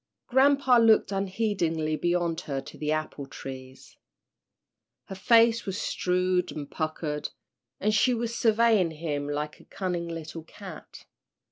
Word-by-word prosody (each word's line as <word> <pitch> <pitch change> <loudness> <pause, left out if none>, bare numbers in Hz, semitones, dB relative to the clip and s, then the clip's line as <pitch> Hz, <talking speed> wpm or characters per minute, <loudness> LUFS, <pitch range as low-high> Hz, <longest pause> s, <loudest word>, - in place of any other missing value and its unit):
Grampa 265 -1 +4
looked 225 -2 +4
unheedingly 190 -6 -1
beyond 175 0 0
her 135 -1 -1
to - - -10
the 150 0 -2
apple 155 -2 -3
trees. 130 -1 -10 1.1
Her - - -8
face 230 +3 +4
was 195 +1 -2
shrewd 180 0 0
and 145 -2 -7
puckered, 155 -1 -3 0.5
and 215 +2 +1
she 245 +4 +3
was 230 0 -3
surveying 220 -5 +3
him 150 -3 -4
like 150 +1 -3
a - - -18
cunning 175 -3 -3
little 165 -1 -6
cat. 180 +1 -11
175 Hz, 130 wpm, -27 LUFS, 155-215 Hz, 1.1 s, Grampa